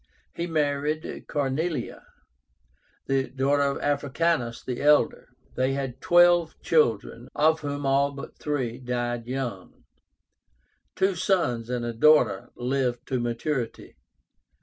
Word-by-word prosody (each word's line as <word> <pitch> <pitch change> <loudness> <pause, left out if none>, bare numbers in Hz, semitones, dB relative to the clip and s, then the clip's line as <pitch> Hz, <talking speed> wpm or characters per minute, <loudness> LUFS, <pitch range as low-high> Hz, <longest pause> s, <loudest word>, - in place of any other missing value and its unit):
He 170 - -3
married 150 -1 -2
CORNELIA, 145 0 -2 1.0
the 135 -1 0
daughter 135 +3 +1
of 140 0 +1
Africánus 145 -3 -1
the 125 -2 -4
elder. 150 +1 +3 0.3
They 130 +1 +1
had 135 -2 -4
twelve 175 -1 +4
children, 120 -5 +1
of 160 +1 +3
whom 145 -1 -4
all 140 +1 +2
but 140 0 -10
three 130 -5 -2
died 120 -2 -3
young. 125 -7 -5 1.1
Two 190 +1 +2
sons 160 - 0
and 125 -1 -2
a 120 - -3
daughter 120 -5 +4
lived 125 -1 -1
to 130 - 0
maturity. 120 +1 -3
135 Hz, 115 wpm, -26 LUFS, 120-150 Hz, 1.1 s, twelve